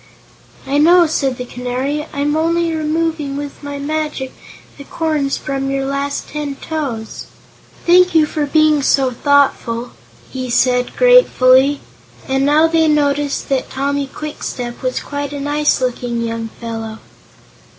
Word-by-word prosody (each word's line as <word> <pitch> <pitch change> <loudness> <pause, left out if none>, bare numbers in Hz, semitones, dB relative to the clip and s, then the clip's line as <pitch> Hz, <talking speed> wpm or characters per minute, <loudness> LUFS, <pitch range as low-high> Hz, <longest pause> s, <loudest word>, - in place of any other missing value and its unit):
"I 275 +2 0
know," 345 +3 +6
said 275 -5 -1
the 250 - -5
Canary. 255 +5 -3
"I'm 290 +1 -1
only 330 +1 +1
removing 310 -2 -1
with 285 0 -7
my 285 -1 -6
magic 300 -2 -3 0.5
the - - -8
corns 300 -2 -1
from 270 -1 -3
your 270 0 -1
last 280 +1 -3
ten 295 -2 -4
toes." 270 -9 -5 0.6
"Thank 360 0 +5
you 315 -1 +6
for 300 -1 -2
being 310 0 +3
so 270 -1 +2
thoughtful," 245 -3 +1 0.4
he 255 -1 -5
said 250 +1 +1
gratefully, 285 - +5 0.5
and 270 0 +1
now 305 +2 +5
they 325 -1 +2
noticed 290 -1 +1
that 270 -2 -1
Tommy 280 +1 -2
Kwikstep 265 -4 -6
was 255 -1 -2
quite 285 0 -5
a 285 - -4
nice 295 +1 +1
looking 245 -2 -2
young 230 0 -3
fellow. 225 -1 -6
285 Hz, 140 wpm, -17 LUFS, 260-305 Hz, 0.6 s, know